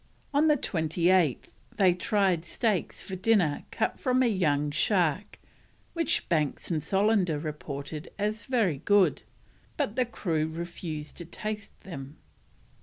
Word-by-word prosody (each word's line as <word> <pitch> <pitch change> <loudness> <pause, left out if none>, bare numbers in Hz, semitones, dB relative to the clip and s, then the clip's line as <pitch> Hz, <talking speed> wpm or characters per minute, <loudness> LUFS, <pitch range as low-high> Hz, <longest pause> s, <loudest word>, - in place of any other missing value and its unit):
On 295 +3 +4
the 300 -1 +5
28th 170 - +1 0.2
they 185 -3 +5
tried 185 -2 +1
steaks 205 +2 -1
for 190 - -6
dinner 185 -6 +2
cut 225 - -1
from 255 0 +2
a - - +4
young 150 -8 +1
shark, 185 +3 +1 0.6
which 330 -3 +1
Banks 155 -1 0
and 160 -2 0
Solander 195 -3 +2
reported 150 -1 -6
as 210 +2 -2
very 215 - +1
good, 190 -2 +3 0.6
but 205 - -1
the 255 0 +2
crew 160 -9 -1
refused 160 -2 -6
to 170 - -7
taste 215 +4 -6
them. 140 -5 -8
180 Hz, 130 wpm, -28 LUFS, 155-210 Hz, 0.6 s, the